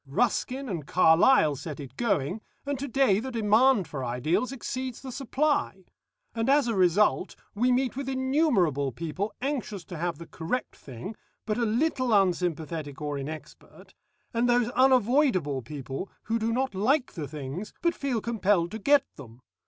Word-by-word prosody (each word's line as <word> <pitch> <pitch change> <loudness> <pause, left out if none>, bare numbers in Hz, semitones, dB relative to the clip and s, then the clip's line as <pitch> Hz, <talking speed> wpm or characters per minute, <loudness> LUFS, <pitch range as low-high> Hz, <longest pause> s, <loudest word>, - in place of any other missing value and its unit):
Ruskin 250 - 0
and 170 - -4
Carlyle 160 - +5
set 150 +2 -7
it 140 -3 -9
going, 200 - 0 0.2
and 285 -2 -2
to 280 - -3
day 245 -6 +3
the 260 +4 -5
demand 225 -2 +3
for 135 -3 -5
ideals 130 - 0
exceeds 255 -1 -5
the 265 - -8
supply. 270 -7 -1 0.5
And 225 +2 -1
as 280 -2 +4
a 230 - 0
result, 190 +1 +2 0.2
we 245 +5 +2
meet 250 0 +1
with 270 0 -4
innumerable 260 - +1
people 170 - -4
anxious 245 -9 -3
to 175 - -8
have 170 -1 -2
the 170 - -9
correct 170 +11 -4
thing, 135 - -8 0.3
but 215 +2 -1
a 235 - +2
little 250 0 +1
unsympathetic 165 -5 -2
or 145 -2 -3
inexpert, 150 +1 -9 0.4
and 240 +1 +1
those 240 -1 +3
unavoidable 245 - +3
people 135 - -6
who 230 +1 -1
do 225 +1 0
not 260 0 0
like 250 +9 +1
the 155 -5 -5
things 150 +7 -6
but 340 0 +3
feel 265 -8 -2
compelled 205 -6 +1
to 220 - -5
get 280 +5 +4
them. 125 -3 -12
210 Hz, 160 wpm, -27 LUFS, 160-255 Hz, 0.5 s, Carlyle